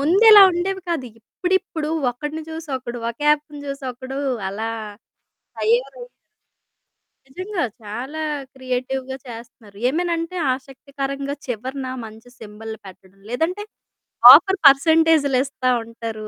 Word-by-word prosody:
ముందిలా 400 +8 +7
ఉండేవి 380 +2 -2
కాదు. 305 -7 -2
ఇప్పుడిప్పుడు 360 +3 -2 0.2
ఒకడిని 295 +6 -6
చూసి, 320 0 -8
ఒకడు 240 -1 -7
ఒక 235 - -13
యాప్‌ని 300 0 0
చూసి 275 0 -6
ఒకడు 260 +2 -7 0.3
అలా 220 +4 -4 0.9
తయారయ్ 250 - -1 1.2
నిజంగా. 370 +7 -4 0.2
చాలా 255 +9 -6 0.3
క్రియేటివ్‌గా 260 +1 -4
చేస్తన్నారు. 230 -3 -12
ఏమనంటే 335 +3 -2 0.2
ఆసక్తికరంగా 275 +1 -6
చివరన 260 +3 -5 0.2
మంచి 220 +2 -13
సింబల్లు 220 +1 -9
పెట్టడం. 190 0 -15
లేదంటే, 330 - -2 0.7
ఆఫర్ 380 +6 +5
పర్సెంటేజ్‌లిస్తా 280 -3 +3
ఉంటారు. 225 -1 -7
270 Hz, 100 wpm, -21 LUFS, 240-320 Hz, 1.2 s, ముందిలా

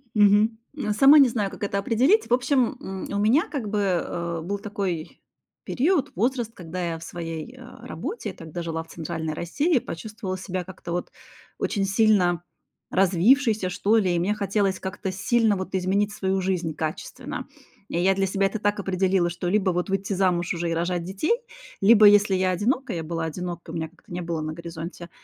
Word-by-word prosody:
Мгм. 210 +2 +5 0.4
Сама 275 +7 +8
не 270 -3 +7
знаю, 210 -4 -1
как - - -9
это 200 0 -1
определить. 260 - +3
В - - +3
общем, 255 0 +2
м, 190 -1 -6
у 200 - -1
меня 225 +10 +3
как 265 -8 -3
бы, 210 0 0
э, 170 -3 -1
был 200 +5 -3
такой 195 -6 -4 0.4
период, 290 +1 +1
возраст, 235 +2 0
когда 180 +1 -6
я 165 - -5
в - - -10
своей 165 +7 -6
работе, 255 - -6
я - - -9
тогда 165 +1 -7
жила 165 -1 -3
в - - -23
центральной 160 -1 -4
России, 280 - +1
почувствовала 190 0 -6
себя 185 -1 -4
как-то 185 -1 -9
вот 175 - -3 0.5
очень 195 -2 0
сильно 195 -4 +3 0.5
развившейся 195 +3 +3
что 205 +4 +2
ли, 185 -5 +2
и - - +1
мне 190 +5 +1
хотелось 200 -2 0
как-то 190 0 -4
сильно 210 +2 +2
вот 190 0 -4
изменить 200 +3 +1
свою 190 0 0
жизнь 180 -3 -1
качественно. 155 0 -5 0.4
И 170 - -1
я 190 +2 +3
для 195 0 +1
себя 195 +1 +1
это 215 +3 -4
так 205 0 0
определила, 190 -2 +1
что 175 +1 -3
либо 195 -1 +2
вот 180 +2 -2
выйти 195 +1 -1
замуж 180 -2 +1
уже 170 0 -2
и - - 0
рожать 175 +1 -1
детей, 195 - 0 0.5
либо, 215 +1 +7
если 205 -1 +5
я 185 0 +2
одинока- 240 +9 0
я 165 -2 -3
была 165 0 -3
одинока, 175 +1 -5
у - - -9
меня 160 -1 -3
как-то 175 +2 -23
не 180 - -3
было 170 -1 -3
на 155 0 -3
горизонте 170 +1 -8
190 Hz, 190 wpm, -25 LUFS, 175-215 Hz, 0.5 s, Сама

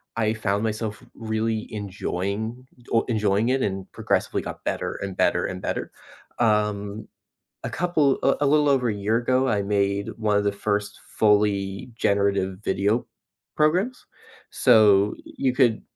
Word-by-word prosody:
I 110 -1 +1
found 105 -1 -1
myself 110 -1 -3
really 110 0 -2
enjoying 100 +4 -4 0.3
oh 115 - +4
enjoying 105 0 +1
it 130 +1 +1
and 95 -3 -3
progressively - - -1
got - - -8
better - - -2
and 95 -2 -5
better - - +2
and 95 0 -5
better, - - -3 0.5
um, 105 -2 0 0.6
a - - -3
couple, 155 -6 +1
uh, 135 - +4
a - - +3
little 150 0 +4
over 130 -3 +2
a 105 - 0
year 105 +3 0
ago, 130 +2 +1
I 105 -4 +1
made 100 0 0
one 105 -2 +1
of 105 - +1
the 100 - +1
first 105 0 -2 0.2
fully 105 -1 +2
generative 100 -3 +1
video 100 +5 +1 0.5
programs, 180 +12 +1 0.5
so, 105 -5 +5
you 130 -2 -1
could 120 -4 +3
105 Hz, 145 wpm, -24 LUFS, 100-120 Hz, 0.6 s, so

